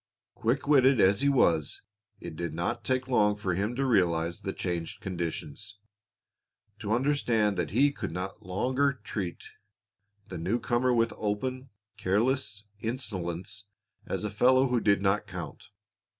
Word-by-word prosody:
Quick 125 +6 -1
witted 135 -3 +5
as 100 +4 +4
he 140 - +4
was, 85 - +2 0.4
it - - -8
did 85 -1 -4
not 85 +1 -2
take 130 0 0
long 105 -5 +3
for 100 -3 -2
him 100 +7 -1
to 135 +2 0
realize 85 -7 +1
the 95 - -3
changed 85 -4 -4
conditions, 90 +2 -5 1.0
to 105 -1 -4
understand 115 -5 +2
that 85 -4 -1
he 140 +7 +3
could - - -5
not 90 +3 -5
longer 130 +10 +1
treat 95 -7 -4 0.8
the - - -6
new 95 +9 0
comer 120 +1 +1
with 115 -1 +2
open, 130 +6 -2 0.3
careless 105 +2 0 0.2
insolence 100 -5 -4 0.4
as - - -2
a 105 - -2
fellow 130 +5 +4
who 125 -1 +2
did 100 -1 +3
not 100 +1 +1
count. 90 -3 -8
105 Hz, 145 wpm, -29 LUFS, 90-125 Hz, 1.0 s, witted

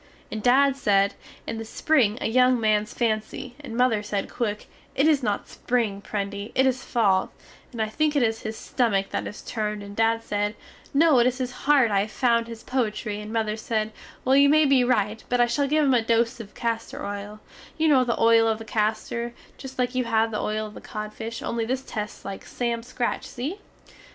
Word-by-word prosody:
And 215 - -4
dad 270 +3 +4
sed, 200 -6 +2 0.3
In 225 - -4
the - - -4
spring 230 -1 +2
a - - -2
yung 250 +2 +4
mans 215 -1 +1
fancy, 230 +2 -2
and 250 -6 -7
mother 250 -4 +3
sed 205 -1 -3
quick, 210 -4 -2 0.3
It 280 - +3
is 300 -3 +4
not 210 -4 -1
spring, 225 -5 -1
Prendy, 200 0 -4
it 265 - +4
is 260 0 +1
fall, 200 -6 +2 0.4
and 235 - -8
I 220 - +1
think 300 +7 0
it 280 - +3
is 225 -1 0
his 220 0 -5
stummick 200 -6 0
that - - -2
is 210 - -9
turned 210 -2 -3
and 200 0 -9
dad 225 +1 +2
sed, 205 0 -1 0.4
No 290 -2 +5
it 240 - +5
is 255 0 0
his 255 -1 -3
heart 265 -2 +3
I 200 - +3
have 210 +2 -2
found 235 -2 +2
his 230 -1 -9
poitry, 215 -4 -2
and 210 +1 -8
mother 220 -2 0
sed, 220 0 -2 0.3
Well 260 +1 +4
you 280 +1 +6
may 310 +1 +5
be 270 -3 +4
rite 220 -3 0
but 245 - +1
I 240 - +6
shall 280 +4 0
give 305 +1 +3
him 270 - +4
a 245 - +4
dose 230 +2 +1
of 210 -3 -10
caster 230 -1 -3
oil, 205 +1 -6 0.4
You 320 0 +2
no 270 -4 +5
the 235 -2 -1
oil 225 0 +5
of 220 -1 +1
the 225 - -9
caster, 220 +2 -1 0.3
just 265 -1 -9
like 250 0 0
you 255 -1 0
had 225 0 +2
the 215 - -2
oil 215 0 -1
of 210 - -9
the - - -10
codfish 215 +2 -6
only 230 -1 -1
this 260 +3 -2
tests 210 -4 -6
like 195 -1 -6
sam 235 -1 -2
scratch 240 0 -3
see? 290 +12 -5
230 Hz, 215 wpm, -25 LUFS, 215-255 Hz, 0.4 s, you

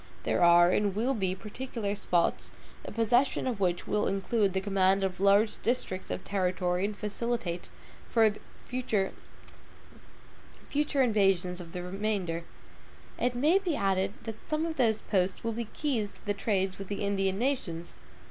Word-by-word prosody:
There - - 0
are, 175 0 +7
and 200 0 +1
will 240 +6 +1
be, 190 -6 -1
particular 215 +1 -4
posts, 175 -4 0 0.3
the - - -7
possession 240 +4 +2
of 245 -5 -2
which 180 -2 0
will 210 - 0
include 195 +1 +1
the 190 - +1
command 195 0 +2
of 190 -1 -2
large 200 +2 +3
districts 225 -6 -1
of - - -4
territory, 180 -1 0
and 205 0 -4
facilitate 210 -4 -3 1.0
future 225 -6 -1 1.6
invasions 205 -11 +2
of 165 -1 -11
the 180 - -4
remainder. 185 -3 -2 0.8
It 245 0 +1
may 305 +10 +4
be 360 -6 -1
added 195 -3 +1
that 220 -1 -8
some 310 +1 0
of 325 -1 -4
those 225 -4 +2
posts 190 0 0
will 230 - 0
be 235 +1 -3
keys 225 -3 -2
to - - -17
the 205 - +1
trade 195 -2 0
with 195 - -7
the 200 +1 -3
Indian 195 -1 0
nations. 200 -10 -2
200 Hz, 150 wpm, -29 LUFS, 185-230 Hz, 1.6 s, are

